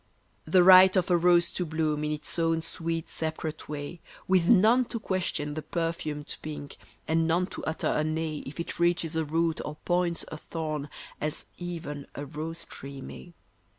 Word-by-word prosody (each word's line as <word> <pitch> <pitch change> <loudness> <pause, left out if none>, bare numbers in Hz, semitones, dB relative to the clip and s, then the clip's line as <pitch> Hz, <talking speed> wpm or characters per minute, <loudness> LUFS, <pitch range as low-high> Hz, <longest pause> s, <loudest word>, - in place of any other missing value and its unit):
The 185 -2 +5
right 185 +1 +9
of 185 -1 +2
a - - +6
rose 175 0 +4
to 180 - -1
bloom 155 -2 -1
In 150 - -1
its 150 +3 -1
own 165 -1 +1
sweet, 165 -1 -2
separate 160 -1 -4
way, 150 +3 -6 0.3
With 185 -2 +3
none 235 +5 +6
to 230 - -5
question 180 -7 -2
the 155 - -4
perfumed 155 -2 -3
pink 150 -2 -7 0.3
And 160 0 +2
none 170 +3 +2
to - - -6
utter 160 - -2
a 155 - +1
nay 155 0 -2
If 145 - -9
it 170 - -4
reaches 170 -1 +1
a 160 - +1
root 165 +2 0
or 150 - -5
points, 175 -1 +1
a 155 - -6
thorn, 155 -2 -4 0.3
as 150 0 -2
even 165 -5 -5
a 145 - -4
rose 160 +3 -5
tree 140 0 -9
may. 170 +5 -10
165 Hz, 180 wpm, -28 LUFS, 150-175 Hz, 0.3 s, right